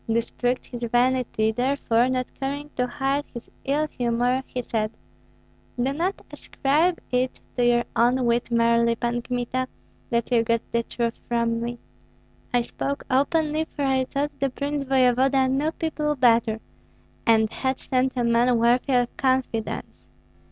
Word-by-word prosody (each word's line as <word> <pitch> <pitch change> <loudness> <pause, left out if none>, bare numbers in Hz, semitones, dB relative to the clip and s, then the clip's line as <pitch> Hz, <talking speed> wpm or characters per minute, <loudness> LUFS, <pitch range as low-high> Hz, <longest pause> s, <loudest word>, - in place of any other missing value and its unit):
This 230 0 0
pricked 245 +1 -1
his 240 -1 -8
vanity; 240 -2 +1
therefore, 245 0 +1
not 255 -1 0
caring 285 +2 -4
to 250 0 0
hide 270 +3 -1
his 235 - -9
ill 295 +3 +1
humor, 245 0 0
he 250 - -4
said, 215 -2 -1 0.9
"Do 260 +3 +1
not 350 +6 -2
ascribe 310 +6 0
it 250 0 0 0.2
to 245 - +1
your 240 0 +4
own 245 +2 +3
wit 235 0 +1
merely, 235 0 +3
Pan 240 +1 -1
Kmita, 250 +1 -2 0.4
that 235 -1 -1
you 235 -2 +4
got 230 0 +1
the 235 - +2
truth 235 0 -3
from 230 -1 0
me. 240 +1 -3 0.7
I 245 - +3
spoke 280 +4 -4
openly, 305 +3 +2
for 290 - -5
I 265 -1 +2
thought 285 +2 -2
the 275 - +1
prince 280 +2 -3
voevoda 260 0 +3
knew 280 +4 +1
people 300 -2 -2
better, 230 -4 +3 0.7
and 220 -1 +4
had 260 0 -1
sent 255 0 0
a 245 - 0
man 235 +1 +3
worthy 240 +4 +2
of 245 -1 +1
confidence." 260 -4 0
250 Hz, 150 wpm, -24 LUFS, 235-270 Hz, 0.9 s, your